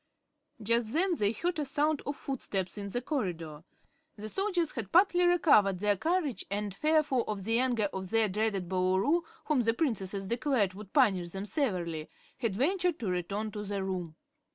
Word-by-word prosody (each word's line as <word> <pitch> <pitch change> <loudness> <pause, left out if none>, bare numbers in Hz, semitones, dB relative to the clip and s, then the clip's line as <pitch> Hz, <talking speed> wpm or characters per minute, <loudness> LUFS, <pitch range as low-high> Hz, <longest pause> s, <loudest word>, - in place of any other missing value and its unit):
Just 230 +1 +1
then 360 +4 +2
they 205 0 +2
heard 340 +9 -2
a - - +1
sound 295 +2 0
of 285 - -2
footsteps 195 -11 -4
in 200 -1 -5
the 245 +4 -3
corridor. 170 - -3 0.5
The 215 0 -7
soldiers 365 - 0
had 225 -7 -5
partly 355 -1 +5
recovered 280 - +4
their 205 +2 +2
courage 315 - -1
and, 205 0 -2
fearful 300 +1 +2
of 205 -2 -3
the 225 +3 +1
anger 240 -5 +2
of 190 -1 -5
their 225 +1 +3
dreaded 200 -2 -1
Boolooroo, 190 - +2 0.2
whom 300 -5 +2
the 225 0 +1
Princesses 195 - -2
declared 235 -4 +1
would 200 0 -11
punish 195 -11 +3
them 195 +3 -5
severely, 180 - -2 0.3
had 230 -6 -1
ventured 355 - +1
to 210 -6 -2
return 200 +5 -2
to 210 - -5
the 200 -1 -3
room. 180 -4 -4
215 Hz, 175 wpm, -30 LUFS, 195-290 Hz, 0.5 s, partly